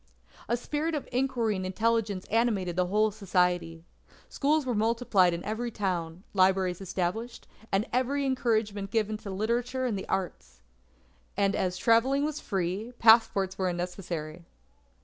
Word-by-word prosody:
"A 235 - +2
spirit 300 +6 -2
of 290 - -4
inquiry 245 -4 0
and 185 - -3
intelligence 210 0 0
animated 210 -6 +1
the 180 0 +1
whole 215 +3 +2
society. 180 -5 0 0.4
Schools 300 +1 +1
were 250 - -1
multiplied 220 -4 +2
in 170 0 -5
every 220 +3 -2
town; 180 -5 -3
libraries 185 -1 +2
established; 195 +6 -3 0.2
and 195 +3 +2
every 270 +3 +1
encouragement 220 -6 0
given 215 0 0
to 210 - -9
literature 235 +6 -1
and 235 -4 0
the 190 - -6
arts. 180 - -4 0.7
And 200 -1 +2
as 180 -1 -1
travelling 245 +8 +3
was 305 0 -3
free, 195 +4 -3
passports 220 -4 +4
were 185 -1 +1
unnecessary. 175 -2 -5
205 Hz, 140 wpm, -28 LUFS, 185-235 Hz, 0.7 s, passports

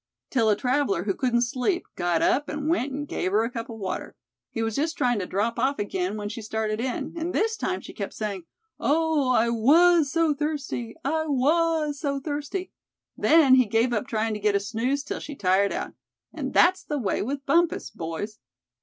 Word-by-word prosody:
till 230 -5 +3
a 210 - +4
traveler, 250 -6 0
who 200 -1 0
couldn't 240 +1 +1
sleep, 260 +9 -1
got 175 -2 +1
up, 290 +2 +2
and 295 0 -3
went 300 -4 +1
and 290 +2 -4
gave 185 - -2
her 215 +3 +3
a 230 - -2
cup 230 -1 -5
of 225 - -7
water. 195 -3 -5 0.3
He 225 - -3
was 225 -1 -2
just 315 +3 -1
tryin' 245 -5 +2
to 185 - -3
drop 225 +5 -1
off 270 +3 +1
again 195 -1 -2
when 205 -1 -4
she 230 +2 -6
started 220 0 -2
in, 255 -1 -3
and 335 +1 -3
this 445 +2 +1
time - - -2
she - - -10
kept - - -5
sayin', 200 -5 -4 0.3
'Oh! 310 -2 +2
I 235 -2 +3
was 305 +6 +5
so 330 -2 +2
thirsty! 280 -6 -3
I 315 +3 0
was 305 +1 +1
so 280 -2 -1
thirsty!' 295 +6 -4 0.4
Then 310 -5 +5
he 255 -1 +6
gave 230 +4 +2
up 210 - -1
tryin' 220 0 -1
to 210 - -4
get 205 0 +2
a - - +4
snooze 245 +7 -1
till - - -4
she 290 - -7
tired 195 -2 +2
out. - - -4 0.4
And - - -4
that's 370 +2 +4
the 295 - -3
way 215 -8 -1
with 275 +5 -3
Bumpus, 335 +4 +1
boys." 170 +6 -5
255 Hz, 205 wpm, -25 LUFS, 215-295 Hz, 0.4 s, he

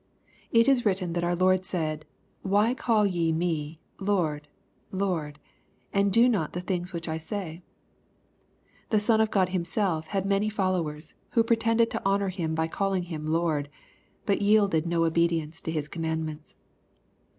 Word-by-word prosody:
It 230 +1 +5
is 265 -3 +4
written 185 -4 0
that 175 0 -1
our 175 0 +1
Lord 185 +1 +3
said, 155 -4 -2 0.2
" - - -40
Why 215 +4 +4
call 225 -4 +2
ye 170 -4 +1
me 160 -2 -2 0.2
Lord, 170 -7 0 0.4
Lord, 175 -7 -2 0.6
and 200 0 +2
do 230 +5 +6
not 200 -11 0
the 180 - -3
things 180 0 -3
which 170 -2 -5
I 160 0 -2
say 170 0 -5 0.6
?" - - -36
The 215 - +3
Son 220 +1 +3
of 220 - +2
God 190 -4 +2
Himself 175 -2 -1
had 195 +2 -2
many 200 +2 +1
followers, 175 -7 -2 0.2
who 230 - +4
pretended 230 0 +2
to - - -3
honor 195 0 +1
Him 165 -4 -2
by 160 0 0
calling 195 +1 -1
Him 155 -1 -5
Lord, 155 -3 0 0.6
but 200 -2 +1
yielded 200 -6 +3
no 170 -1 +2
obedience 165 -1 0
to 160 - -4
His 155 -2 -2
commandments. 160 -1 -4
180 Hz, 160 wpm, -27 LUFS, 160-200 Hz, 0.6 s, do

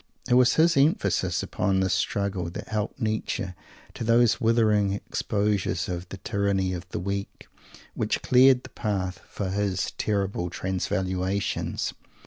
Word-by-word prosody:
It 125 - +2
was 125 0 +5
his 165 +1 +4
emphasis 135 - +2
upon 95 0 0
this 95 -1 +1
struggle 100 -4 -1
that - - -8
helped 105 0 -3
Nietzsche 110 -3 -2 0.4
to - - -5
those 115 0 +3
withering 110 -3 +3
exposures 100 -3 -1
of 90 0 -5
"the 95 - -7
tyranny 95 -1 0
of 90 0 -6
the - - -4
weak" 100 +2 -4 0.5
which - - -1
cleared 130 0 +5
the - - -10
path 95 -4 -3
for 95 -2 -4
his 100 -2 -1
terrific 100 -4 -1
transvaluations. 95 +1 -2
100 Hz, 135 wpm, -26 LUFS, 95-110 Hz, 0.5 s, was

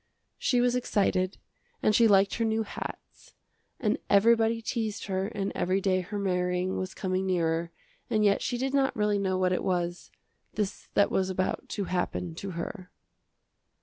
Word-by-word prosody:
She 245 -2 +2
was 245 0 +2
excited 195 -6 +1 0.5
and 215 - +4
she 230 +2 +6
liked 195 -1 +4
her 230 - 0
new 220 0 +1
hats, 210 - -9 0.4
and 220 -4 +1
everybody 225 +2 +4
teased 220 -2 -3
her 190 0 -1
and 205 -3 -3
every 185 +2 +1
day 185 -1 +1
her 200 +4 -5
marrying 180 -1 0
was 185 0 -4
coming 185 0 -1
nearer, 170 -2 0 0.4
and 215 -1 +2
yet 200 -1 +3
she 245 - -1
did 265 +2 -2
not 270 -1 +2
really 210 -1 +1
know 190 -1 0
what 185 0 +2
it - - -1
was, 175 -1 -2 0.5
this 210 -2 -3
that 200 - +4
was 190 0 +1
about 185 0 -2
to 205 - -2
happen 180 -2 -2
to 195 +4 -6
her. 180 +2 -6
195 Hz, 170 wpm, -28 LUFS, 185-220 Hz, 0.5 s, she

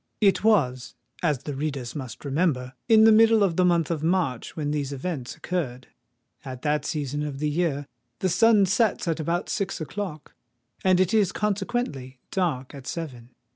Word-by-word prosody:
It 200 -2 +3
was, 130 - +2 0.3
as 150 -7 0
the 145 - -4
readers 135 -4 -4
must 130 -2 -7
remember, 135 -3 0 0.2
in 220 -1 +7
the 225 - +8
middle 225 0 +6
of 180 -4 +1
the 185 - +3
month 170 -3 +2
of 160 -3 -2
March 165 -8 0
when 150 -2 -2
these 145 -2 -2
events 140 -2 -4
occurred. 130 -9 -4 0.5
At 130 -2 -8
that 150 0 0
season 145 -1 -2
of 150 -2 -4
the 150 +1 -1
year 150 -3 0 0.3
the 190 - 0
sun 220 +2 +5
sets 210 -1 +1
at 165 -1 0
about 170 +3 -1
six 195 -2 -2
o'clock; 160 -1 -6 0.5
and 185 -1 +4
it 185 +1 +2
is 205 -4 +3
consequently 195 - -2
dark 155 -9 -1
at 140 -2 -10
seven. 125 -8 -6
160 Hz, 175 wpm, -25 LUFS, 135-190 Hz, 0.5 s, the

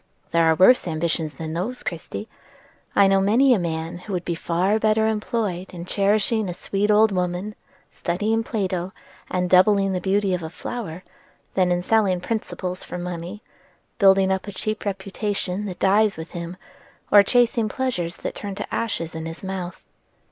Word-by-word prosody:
"There 170 -1 +4
are 160 0 +4
worse 190 +6 +5
ambitions 160 -1 -1
than 160 -1 -5
those, 210 +10 -3
Christie. 175 +5 -5 0.7
I 200 - +6
know 195 0 +4
many 240 +7 +5
a 220 - +2
man 165 0 -3
who 200 +2 -7
would 180 -1 -2
be 175 - -1
far 180 +5 0
better 220 0 +3
employed 210 -4 -2
in 170 0 -6
cherishing 205 +2 +1
a 175 - -4
sweet 200 +3 -1
old 215 +1 +5
woman, 180 +2 -2 0.4
studying 215 +6 -1
Plato, 190 -5 -2 0.4
and 180 0 0
doubling 195 +1 +4
the 180 - -1
beauty 195 +1 +1
of 180 - -1
a 160 - -5
flower, 185 -2 -6 0.5
than 185 -2 +2
in 175 0 +1
selling 200 -4 +2
principles 185 -3 -4
for - - -6
money, 180 +4 -6 0.6
building 195 -1 +5
up 190 +1 -1
a - - -4
cheap 215 +3 -4
reputation 195 0 -3
that 185 -3 -5
dies 205 +1 +3
with 160 +1 -8
him, 170 +1 -6 0.5
or 205 - +9
chasing 230 0 +2
pleasures 200 -10 -2
that - - -4
turn 200 -2 -6
to 205 - -6
ashes 170 -8 -2
in 160 0 -5
his 165 +3 -8
mouth." 190 -2 -5
190 Hz, 170 wpm, -23 LUFS, 175-210 Hz, 0.7 s, or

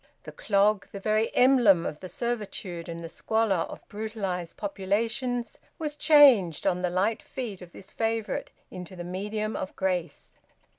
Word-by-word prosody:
The - - -9
clog, 200 0 +2
the 200 - -6
very 215 +2 +1
emblem 240 -9 +5
of 150 - -4
the 185 - -8
servitude 200 -6 -4
and 170 0 -6
the - - -5
squalor 220 +3 0
of - - -11
brutalised 200 -5 -4
populations, 225 +5 -2 0.2
was 300 -3 -4
changed, 270 - +6
on 180 0 +1
the 180 - 0
light 195 +5 0
feet 225 -8 -6
of 175 -1 -11
this 190 - -11
favourite, 225 -1 -2 0.2
into 180 0 -8
the 175 - -6
medium 210 +4 -3
of 190 - -5
grace. 185 -3 -2
205 Hz, 155 wpm, -27 LUFS, 180-225 Hz, 0.2 s, changed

